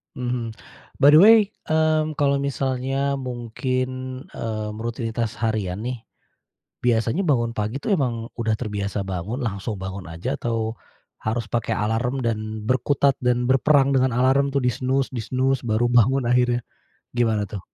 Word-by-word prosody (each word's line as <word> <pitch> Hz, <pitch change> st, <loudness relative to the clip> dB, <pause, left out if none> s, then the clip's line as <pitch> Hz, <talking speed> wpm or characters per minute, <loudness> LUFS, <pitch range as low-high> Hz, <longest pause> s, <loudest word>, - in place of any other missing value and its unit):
Mhm. 120 Hz, -2 st, -3 dB, 0.5 s
By 140 Hz, -, +7 dB
the -, -, +9 dB
way, 225 Hz, +2 st, +9 dB, 0.3 s
mmm, 155 Hz, 0 st, +2 dB
kalau 140 Hz, -1 st, +3 dB
misalnya 135 Hz, 0 st, -1 dB
mungkin, 130 Hz, +1 st, -3 dB
mmm, 110 Hz, -1 st, -4 dB
rutinitas 115 Hz, 0 st, -3 dB
harian 110 Hz, -5 st, -1 dB
nih, 125 Hz, -3 st, -5 dB, 0.8 s
biasanya 120 Hz, -, +1 dB
bangun 120 Hz, -7 st, +1 dB
pagi 110 Hz, +6 st, -2 dB
tuh 200 Hz, +4 st, +1 dB
emang 120 Hz, -6 st, -2 dB
udah 115 Hz, -2 st, 0 dB
terbiasa 105 Hz, -3 st, -3 dB
bangun, 95 Hz, +8 st, -3 dB
langsung 105 Hz, -3 st, -3 dB
bangun 95 Hz, 0 st, -6 dB
aja, 80 Hz, 0 st, -4 dB
atau 115 Hz, -1 st, -2 dB, 0.5 s
harus 110 Hz, 0 st, -2 dB
pakai 115 Hz, +1 st, -1 dB
alarm, 115 Hz, +5 st, 0 dB
dan 110 Hz, -2 st, -2 dB
berkutat, 140 Hz, +1 st, +2 dB
dan 125 Hz, 0 st, +2 dB
berperang 135 Hz, +1 st, +4 dB
dengan 130 Hz, -1 st, +2 dB
alarm 135 Hz, +3 st, +2 dB
tuh 140 Hz, -, +1 dB
di-snooze 130 Hz, +2 st, 0 dB
di-snooze 130 Hz, +3 st, 0 dB
baru 115 Hz, +1 st, +1 dB
bangun 120 Hz, +2 st, +3 dB
akhirnya. 125 Hz, 0 st, +3 dB, 0.5 s
Gimana 110 Hz, -3 st, +1 dB
tuh? 100 Hz, -1 st, -7 dB
120 Hz, 140 wpm, -23 LUFS, 110-135 Hz, 0.8 s, the